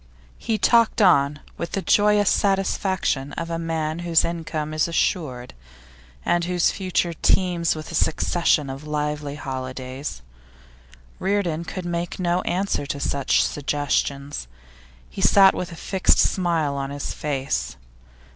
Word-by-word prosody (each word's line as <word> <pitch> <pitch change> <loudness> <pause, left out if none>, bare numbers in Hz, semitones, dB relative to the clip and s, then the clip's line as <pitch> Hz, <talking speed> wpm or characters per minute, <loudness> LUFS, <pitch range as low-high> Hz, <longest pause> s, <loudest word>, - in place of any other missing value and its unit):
He 225 - -1
talked 230 +2 +3
on 145 -7 +4 0.2
with 170 - -4
the 195 - -1
joyous 205 0 +4
satisfaction 190 -7 0
of 165 0 -4
a 165 - -2
man 160 -1 -2
whose 170 -1 +3
income 160 -2 -4
is 155 +1 +1
assured, 150 -7 -1 0.7
and 175 0 +2
whose 180 -1 +2
future 185 -2 -1
teems 175 0 +1
with 155 +1 -7
a - - -8
succession 160 -2 +1
of 135 +3 -9
lively 150 -1 -2
holidays. 130 - -6 1.0
Reardon 185 -4 -1
could 185 +1 -6
make 175 0 -3
no 180 0 0
answer 185 -5 -1
to 140 - -3
such 140 -1 +1
suggestions; 140 - -2 0.6
he 65 - -7
sat 195 -1 +6
with 180 0 -4
a - - -8
fixed 190 +3 +2
smile 170 -6 +1
on 135 0 -3
his 145 0 -4
face. 130 - -2
165 Hz, 135 wpm, -23 LUFS, 145-180 Hz, 1.0 s, sat